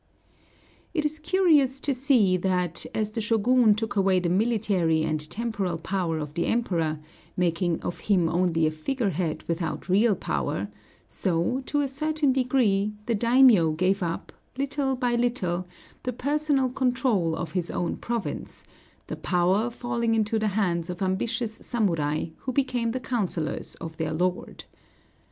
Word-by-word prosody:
It 310 -2 +1
is 305 +1 -1
curious 310 -6 +3
to 280 - 0
see 250 -8 +3
that, 180 -2 0
as 215 -1 -1
the 225 - -2
Shōgun 225 +1 +3
took 220 -1 -3
away 190 -2 +3
the 175 -1 -1
military 190 -5 +1
and 155 -1 0
temporal 205 -6 -2
power 170 -1 -2
of 150 -1 -5
the 170 - -1
Emperor, 170 -10 0 0.4
making 175 -1 +1
of 175 - -4
him 185 -5 +2
only 165 -1 +1
a 155 - +2
figure 205 - -2
head 165 -1 -2
without 165 +1 -3
real 205 +3 +4
power, - - -2 0.4
so, 185 +8 -1
to 290 - +1
a 280 - 0
certain 305 +1 0
degree, 240 -6 +1
the 235 - 0
daimiō 230 -9 +5
gave 190 +3 +1
up, 170 -2 -4 0.2
little 275 0 0
by 245 -1 0
little, 195 -8 0 0.3
the 250 - -3
personal 285 0 0
control 245 -10 +1
of 165 -1 -5
his 180 -1 -2
own 175 - -2
province, 235 -2 -5 0.4
the - - -5
power 185 +6 +1
falling 235 -1 -1
into 220 0 +1
the 215 - 0
hands 170 -4 0
of 180 +2 -4
ambitious 225 +4 -1
samurai, 165 -12 -1
who 260 - -4
became 250 -3 0
the 255 +3 -2
councilors 200 -10 -2
of 160 -1 -8
their 160 -1 -2
lord. 180 +3 -2
210 Hz, 150 wpm, -26 LUFS, 175-250 Hz, 0.4 s, daimiō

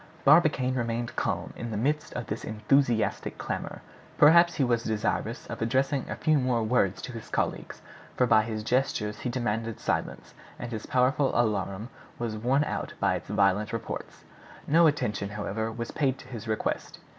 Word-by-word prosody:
Barbicane 145 -4 +5
remained 120 -1 -2
calm - - -2
in 120 - -5
the 110 - -3
midst 150 +7 0
of 120 - -4
this 105 - -5
enthusiastic 110 +2 +1
clamor; - - -5 0.3
perhaps 170 +3 +7
he 140 - +1
was 120 -2 +1
desirous 110 -1 -2
of - - -7
addressing 135 +3 0
a - - -3
few 155 -2 +2
more 125 -3 +1
words 110 -5 +1
to - - -5
his 115 -3 -9
colleagues, - - -3 0.3
for 125 - +4
by 110 -2 +5
his 110 -1 -4
gestures 115 -3 0
he 125 - -3
demanded 115 -2 -2
silence, - - -3 0.2
and 120 - -6
his 110 -2 -5
powerful 130 +2 +2
alarum 105 -1 -1 0.3
was 115 -2 -3
worn 125 +6 +2
out - - -4
by - - +2
its - - -5
violent 105 0 +2
reports. 115 - -6 0.4
No 165 +2 +5
attention, 105 -9 -1
however, 105 +2 -3
was 115 +1 -5
paid 135 -3 0
to - - -13
his 115 -2 -8
request. 110 0 -2
120 Hz, 170 wpm, -28 LUFS, 110-130 Hz, 0.4 s, perhaps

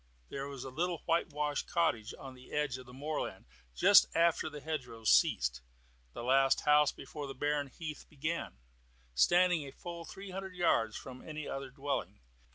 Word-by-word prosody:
There 135 0 -4
was 140 -3 -7
a 135 - -7
little 170 +4 -2
whitewashed 150 -3 0
cottage 160 -10 +1
on 135 -1 -9
the 125 0 -15
edge 150 -4 0
of 130 - -12
the - - -11
moorland 145 +4 -4 0.3
just - - +7
after 165 -1 +3
the 150 -1 -8
hedgerows 125 -8 -2
ceased - - +3 0.5
the - - -6
last 135 +2 +4
house 150 -1 +5
before 145 -2 -7
the 135 - -7
barren 145 +1 0
heath 155 +2 -7
began, 155 - -3 0.6
standing 175 - +4
a 140 - -8
full 170 +2 -7
three 195 +3 -9
hundred 190 0 -6
yards 115 -11 +2
from 130 -1 -9
any 155 -1 -6
other 135 -1 -4
dwelling. 140 +1 -3
145 Hz, 165 wpm, -33 LUFS, 130-165 Hz, 0.6 s, just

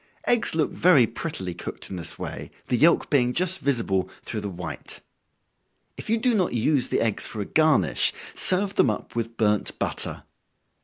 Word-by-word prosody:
Eggs 235 -7 +2
look 155 -2 +1
very 155 -8 +5
prettily 115 - -5
cooked - - -7
in - - -4
this 85 -3 -5
way, - - -6 0.2
the - - 0
yelk 165 +7 +3
being 125 -4 +3
just 185 +3 +3
visible 115 -9 0
through 110 - -4
the 100 - -4
white. 90 -1 -7 1.0
If - - -9
you 225 - +3
do 240 +2 +1
not 190 -5 +1
use 125 +3 +1
the - - +1
eggs 110 -3 0
for 110 - -7
a 100 - -2
garnish, 155 +3 +3 0.2
serve 195 +2 +2
them - - +5
up 105 - -5
with 115 0 -3
burnt 105 -2 0
butter. - - -2
125 Hz, 175 wpm, -25 LUFS, 105-170 Hz, 1.0 s, very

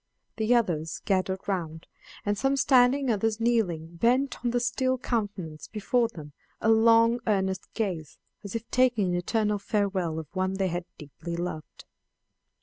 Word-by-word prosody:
The 225 +2 +3
others 165 -9 0
gathered 190 -1 0
round, 165 -5 -3 0.4
and 205 0 +1
some 270 +6 +1
standing, 260 0 +4
others 220 +1 0
kneeling, 175 -9 0
bent 250 +8 +1
on 240 - +1
the 245 +1 +1
still 255 +2 0
countenance 200 -11 -3
before 230 +3 +1
them 155 -10 -11 0.3
a 220 - +1
long 230 +1 +5
earnest 190 -3 0
gaze, 180 -9 -3 0.3
as 200 +2 -7
if 230 0 -4
taking 245 -6 +3
an 175 - 0
eternal 210 +3 0
farewell 195 -5 -1
of 160 - -4
one 185 0 0
they 190 -1 0
had 175 0 -3
deeply 155 +3 -7
loved. 170 -3 -6
205 Hz, 150 wpm, -27 LUFS, 175-235 Hz, 0.4 s, long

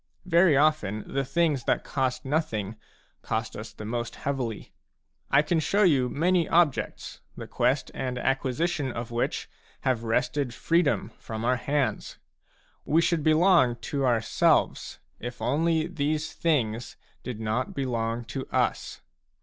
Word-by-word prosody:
Very 170 -4 +5
often 145 -9 +2
the 135 - +1
things 150 -3 0
that - - +1
cost 130 -2 -2
nothing 115 -8 -1 0.5
cost 110 0 -3
us 110 +1 -7
the 105 - -9
most 120 +1 -3
heavily; 130 -6 -4 0.6
I 140 +2 +5
can 160 +2 +1
show 200 +6 +2
you 135 -9 +3
many 170 +4 +1
objects 165 -5 +1 0.2
the - - -6
quest 125 +3 0
and 125 -1 -3
acquisition 135 +3 0
of 115 0 -6
which 120 0 -2 0.3
have 125 -3 0
wrested 120 +2 0
freedom 160 - +1
from 110 0 -5
our 125 +1 +2
hands. 130 -3 -1 0.7
We 160 - +2
should 170 -1 +2
belong 155 -4 +4 0.2
to 140 -1 0
our 120 -3 +3
selves, - - +1 0.2
if 120 +1 -6
only 160 +4 +1
these 155 -2 -2
things 120 -8 -1 0.2
did 125 -4 -6
not 110 +3 -2
belong 120 -3 -2
to 130 +3 -5
us. - - -1
135 Hz, 140 wpm, -27 LUFS, 120-155 Hz, 0.7 s, Very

